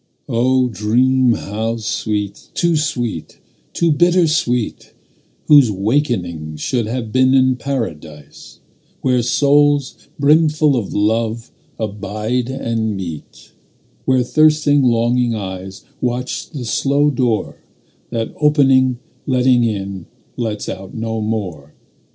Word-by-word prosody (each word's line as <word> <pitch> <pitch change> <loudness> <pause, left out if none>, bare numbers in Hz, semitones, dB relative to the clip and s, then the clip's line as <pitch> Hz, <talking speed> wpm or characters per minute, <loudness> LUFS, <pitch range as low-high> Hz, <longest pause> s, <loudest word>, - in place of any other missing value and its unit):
O 125 +2 +2
dream 125 +4 +2
how 110 +2 -3
sweet, 105 -2 -3
too 170 -1 +2
sweet, 120 - -3 0.3
too 170 -1 +1
bitter 175 +4 +3
sweet, 125 -7 -1 0.5
Whose 145 -5 +6
wakening 95 - -1
should 115 - -2
have 115 -1 -4
been 130 +2 +3
in 130 -1 +4
Paradise, 80 - -6 0.4
Where 125 -2 +2
souls 145 +2 +2
brimful 150 0 +3
of 115 -6 -2
love 110 +2 -1 0.3
abide 110 +4 -3
and 115 -5 -2
meet; 85 -5 -8 0.5
Where 130 -1 +3
thirsting 150 +1 +3
longing 120 -1 +2
eyes 95 -1 -7 0.2
Watch 125 0 -3
the 140 -6 -6
slow 140 +7 +1
door 120 -5 -1 0.5
That 115 -1 -3
opening, 135 -4 +3 0.3
letting 125 -2 +3
in, 100 -5 -3 0.3
lets 110 -3 -3
out 95 0 -7
no 110 0 -3
more. 95 -10 -4
120 Hz, 110 wpm, -18 LUFS, 105-135 Hz, 0.5 s, Whose